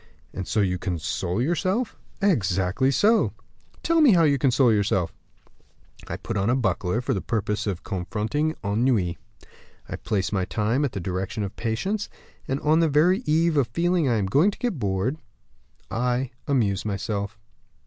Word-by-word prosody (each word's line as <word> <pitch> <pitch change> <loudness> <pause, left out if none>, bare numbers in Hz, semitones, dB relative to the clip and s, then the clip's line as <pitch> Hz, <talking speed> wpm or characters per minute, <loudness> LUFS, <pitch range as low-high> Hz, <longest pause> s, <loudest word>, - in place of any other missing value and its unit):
"And 95 - -5
so 105 - +1
you 90 -2 0
console 90 +1 -2
yourself?" 185 - 0 0.3
"Exactly 100 - +2
so." 210 - +3 0.5
"Tell 335 -1 +3
me 275 -8 +7
how 170 -2 +5
you 140 -3 +3
console 125 -2 +4
yourself." 100 -4 +1 0.9
"I - - -4
put 115 - -4
on 100 +3 +1
a 125 - +3
buckler 95 -2 0
for 135 +2 -1
the 95 - -2
purpose 105 -1 -2
of 95 -3 -3
confronting 110 - -2
ennui. 100 -4 +1 0.7
I - - -5
place 100 -3 -1
my 95 -3 0
time 115 +8 0
at 140 - -1
the 100 - -3
direction 95 +3 -3
of 100 - -5
patience; 190 - -2 0.4
and 135 +1 -1
on 155 +2 +3
the 165 -1 +3
very 165 +7 +4
eve 165 +1 +3
of 135 -4 +3
feeling 170 +3 +1
I 120 - +2
am 100 - 0
going 145 - +4
to 205 - -6
get 235 - -2
bored, 100 +8 -1 0.7
I 125 +1 0 0.2
amuse 105 -9 +1
myself." 100 +1 -3
115 Hz, 165 wpm, -25 LUFS, 100-150 Hz, 0.9 s, me